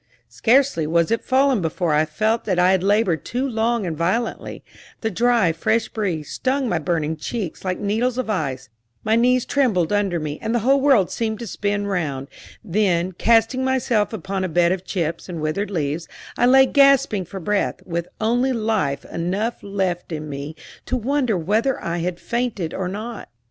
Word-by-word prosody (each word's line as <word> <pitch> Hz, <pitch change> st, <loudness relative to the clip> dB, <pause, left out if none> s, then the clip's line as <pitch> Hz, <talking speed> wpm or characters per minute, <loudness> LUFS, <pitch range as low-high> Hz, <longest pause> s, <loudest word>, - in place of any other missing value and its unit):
Scarcely 250 Hz, -, +2 dB
was 170 Hz, +3 st, +2 dB
it 230 Hz, -, 0 dB
fallen 265 Hz, -3 st, +2 dB
before 165 Hz, 0 st, -1 dB
I 150 Hz, +1 st, +3 dB
felt 215 Hz, +9 st, 0 dB
that 185 Hz, -4 st, 0 dB
I 180 Hz, +1 st, +4 dB
had 190 Hz, -2 st, +2 dB
labored 200 Hz, -4 st, +2 dB
too 255 Hz, +3 st, -2 dB
long 230 Hz, -2 st, 0 dB
and 165 Hz, -3 st, -3 dB
violently: 185 Hz, +9 st, -2 dB, 0.4 s
the 220 Hz, -, -1 dB
dry, 230 Hz, -3 st, +3 dB
fresh 220 Hz, +8 st, 0 dB
breeze 180 Hz, -9 st, -3 dB
stung 265 Hz, 0 st, 0 dB
my 175 Hz, -7 st, 0 dB
burning 160 Hz, -1 st, -1 dB
cheeks 185 Hz, +3 st, -5 dB
like 185 Hz, -1 st, -1 dB
needles 225 Hz, +5 st, 0 dB
of 255 Hz, -, -2 dB
ice, 135 Hz, -, -2 dB, 0.4 s
my 220 Hz, +1 st, +2 dB
knees 250 Hz, +1 st, +3 dB
trembled 210 Hz, -, +1 dB
under 200 Hz, -4 st, +1 dB
me, 150 Hz, -1 st, -5 dB
and 225 Hz, +2 st, -1 dB
the 235 Hz, -1 st, -1 dB
whole 275 Hz, +1 st, +4 dB
world 265 Hz, -10 st, +4 dB
seemed 220 Hz, -2 st, -2 dB
to 235 Hz, -, -6 dB
spin 205 Hz, 0 st, -2 dB
round; 150 Hz, -8 st, -2 dB, 0.3 s
then, 185 Hz, -3 st, +1 dB
casting 230 Hz, +6 st, +2 dB
myself 250 Hz, -5 st, +1 dB
upon 195 Hz, -2 st, -3 dB
a 185 Hz, -, -1 dB
bed 170 Hz, +1 st, +3 dB
of 185 Hz, -1 st, -2 dB
chips 170 Hz, -2 st, -3 dB
and 170 Hz, -2 st, -5 dB
withered 155 Hz, +7 st, -2 dB
leaves, 160 Hz, -3 st, -2 dB, 0.3 s
I 245 Hz, -, +3 dB
lay 265 Hz, +1 st, +7 dB
gasping 275 Hz, -7 st, +4 dB
for 190 Hz, +4 st, -7 dB
breath, 195 Hz, -1 st, -1 dB
with 170 Hz, 0 st, -3 dB
only 245 Hz, +4 st, +1 dB
life 215 Hz, -, -1 dB
enough 195 Hz, +8 st, -2 dB
left 190 Hz, -4 st, -2 dB
in 155 Hz, -1 st, -4 dB
me 145 Hz, +2 st, -6 dB, 0.3 s
to 255 Hz, -, 0 dB
wonder 250 Hz, -3 st, 0 dB
whether 215 Hz, +10 st, 0 dB
I 170 Hz, +1 st, -3 dB
had 175 Hz, +1 st, -3 dB
fainted 235 Hz, -9 st, -2 dB
or 185 Hz, -, -2 dB
not. 215 Hz, +4 st, -6 dB
200 Hz, 180 wpm, -22 LUFS, 170-235 Hz, 0.4 s, lay